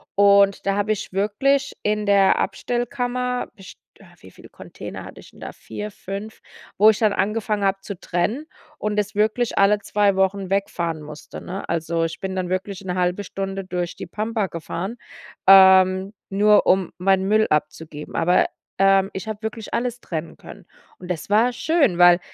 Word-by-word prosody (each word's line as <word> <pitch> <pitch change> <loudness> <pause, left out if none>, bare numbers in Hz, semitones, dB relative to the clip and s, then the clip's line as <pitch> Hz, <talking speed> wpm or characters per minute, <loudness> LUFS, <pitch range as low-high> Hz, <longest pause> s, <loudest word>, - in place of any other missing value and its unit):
Und 200 0 +4
da 195 - +2
habe 205 +1 0
ich 210 -2 -4
wirklich 215 +8 +1
in 210 0 0
der 200 -1 +4
Abstellkammer 245 0 -2
best 190 -1 -13 0.2
äh, - - -17 0.2
wie - - -14
viele - - -16
Container - - -9
hatte - - -12
ich - - -17
denn - - -19
da? - - -8
4, 210 0 -7
5, 200 +2 -8 0.4
wo 210 +2 +7
ich 210 - -5
dann 215 -3 +2
angefangen 210 +1 -1
habe 195 0 +1
zu 195 -1 -7
trennen 215 - -2 0.3
und 210 0 -3
das 210 0 -1
wirklich 220 +3 0
alle 200 +1 +4
2 205 -1 +1
Wochen 190 0 0
wegfahren 170 -5 -2
musste, 150 0 -10
ne? 190 +3 -7
Also, 165 0 -1
ich 165 - -6
bin 190 0 -4
dann 185 -1 -2
wirklich 185 +1 -3
'ne 180 -1 -3
1/2 180 +2 0
Stunde 195 0 -5
durch 180 -2 -4
die - - -7
Pampa 215 -1 -2
gefahren, 180 +6 -6 0.5
ähm, 190 0 +6 0.2
nur 210 +2 +4
um 190 -1 +2
meinen 190 +1 +2
Müll 215 +1 +3
abzugeben. 150 0 -3
Aber, 180 +2 +3 0.3
ähm, 195 0 +4
ich 190 +3 -6
habe 215 -1 -5
wirklich 220 0 -6
alles 245 0 -2
trennen 160 -1 -6
können. - - -13 0.3
Und 180 - -11
das 170 +1 -5
war 225 +4 +3
schön, 280 - +1
weil 175 0 +7
195 Hz, 175 wpm, -22 LUFS, 185-215 Hz, 0.5 s, wo